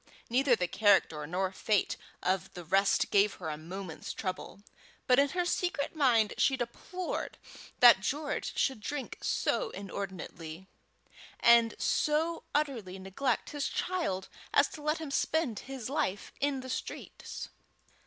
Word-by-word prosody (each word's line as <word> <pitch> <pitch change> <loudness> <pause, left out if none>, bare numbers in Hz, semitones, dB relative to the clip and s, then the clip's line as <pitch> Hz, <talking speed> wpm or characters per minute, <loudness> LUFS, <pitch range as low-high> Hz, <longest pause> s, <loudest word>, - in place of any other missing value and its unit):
Neither 255 0 +4
the 180 -4 -1
character 175 -6 +3
nor 185 +3 -1
fate 205 +1 +1 0.3
of 185 - +3
one 190 - -15
of - - -30
the 175 -1 -7
rest 195 +4 +3
gave 205 0 +4
her 165 -4 -5
a 150 - -2
moment's 170 +2 -7
trouble; 195 +1 -5 0.4
but 250 +1 +5
in 280 0 +4
her 360 +2 0
secret 350 -4 -1
mind 240 -8 +4
she 265 - +3
deplored 300 +9 -4 0.4
that 240 -5 +9
George 290 +9 -2
should 265 -5 +1
drink 280 +4 -4
so - - 0
inordinately, 190 -3 -6 0.7
and 235 -1 +6
so 320 +3 +1
utterly 240 -11 -1
neglect 195 +7 -1
his 290 -1 -1
child 325 - -2 0.3
as 280 - +6
to 305 - -9
let 305 +2 +1
him 315 -3 -6
spend 280 -6 0
his 265 -3 -6
life 260 -9 -2
in 280 -2 0
the 260 - -8
streets. - - -6
235 Hz, 145 wpm, -31 LUFS, 190-285 Hz, 0.7 s, that